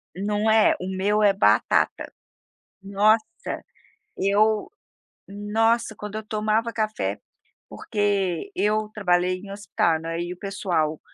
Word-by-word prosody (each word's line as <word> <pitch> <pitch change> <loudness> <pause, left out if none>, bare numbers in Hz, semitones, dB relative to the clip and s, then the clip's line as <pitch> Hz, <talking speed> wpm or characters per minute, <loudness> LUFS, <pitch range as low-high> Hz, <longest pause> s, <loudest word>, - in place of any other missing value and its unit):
Não 205 +3 0
é, 220 0 +5
o 185 - -5
meu 205 +3 +1
é 205 -1 +5
batata. 195 - +2 0.7
Nossa, 210 +8 0 0.5
eu 215 - +2 0.6
nossa 220 +3 0
quando 210 0 -8
eu 215 - -4
tomava 215 +2 0
café, 215 -1 -2 0.5
porque 200 -5 -1
eu 210 +2 0
trabalhei 180 -3 +1
em 195 +1 -10
hospital 175 -5 0
não 165 - -6
é, 165 +1 -3
e 175 +1 -4
o - - -16
pessoal 175 -6 -1
205 Hz, 125 wpm, -24 LUFS, 190-215 Hz, 0.7 s, é